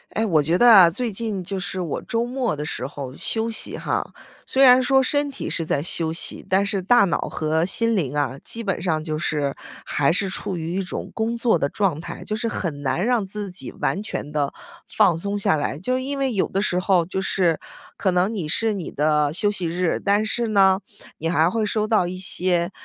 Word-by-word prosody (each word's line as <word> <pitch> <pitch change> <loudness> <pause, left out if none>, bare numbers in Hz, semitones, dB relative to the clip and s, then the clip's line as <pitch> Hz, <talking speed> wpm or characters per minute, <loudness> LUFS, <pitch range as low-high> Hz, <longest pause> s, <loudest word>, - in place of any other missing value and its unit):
诶， 220 +1 +1
我 160 -7 +3
觉 165 +4 +1
得 240 - +5
啊， 195 -7 +9
最 235 +7 -2
近 205 -2 -2
就 195 +2 -4
是 185 0 -4
我 165 -5 -3
周 230 +1 -1
末 245 -5 -2
的 150 +1 -5
时 155 - -4
候 140 -2 -8
休 225 0 -1
息 220 - -1
哈， - - -2 0.3
虽 270 - +2
然 255 -1 +8
说 265 +1 +3
身 285 +2 +1
体 275 - -6
是 165 - +1
在 145 -2 -1
休 165 -1 +1
息， 165 - +1
但 190 +2 +3
是 200 -1 0
大 205 +2 +4
脑 170 - 0
和 155 +1 0
心 230 +5 +2
灵 150 -7 -1
啊， 140 -2 -1
基 230 - -6
本 195 -5 -2
上 160 -3 -1
就 155 -1 -3
是 145 -3 -1 0.3
还 140 -1 +1
是 190 +3 0
处 190 -1 -3
于 165 +1 -4
一 190 - -1
种 190 - -6
工 230 +1 -2
作 230 -6 +2
的 140 - 0
状 180 -6 -1
态， - - -8
就 215 - -3
是 230 +2 -2
很 165 -9 -4
难 140 +7 -1
让 240 -3 +2
自 200 0 -5
己 180 - -2
完 195 - -2
全 150 -7 -6
地 145 -2 -1 0.4
放 195 -6 +3
松 200 +2 -2
下 200 - +2
来。 145 -2 -2
就 190 +11 -2
是 255 - 0
因 280 +2 -3
为 270 -2 0
有 195 - +1
的 195 - -2
时 185 -3 0
候， 185 -2 +2
就 190 +2 -3
是 180 -4 +1 0.4
可 190 - 0
能 180 +4 +1
你 185 -8 -3
是 225 +7 +1
你 190 -5 -5
的 150 0 +1
休 205 +6 +1
息 185 -4 -1
日， 175 +1 -1
但 205 +2 +2
是 235 +2 0
呢， 195 -3 +4 0.4
你 165 - -2
还 165 -1 +3
会 225 +1 0
收 215 0 0
到 215 -5 +2
一 180 +1 -5
些 180 -1 0
190 Hz, 245 characters per minute, -22 LUFS, 160-220 Hz, 0.4 s, 啊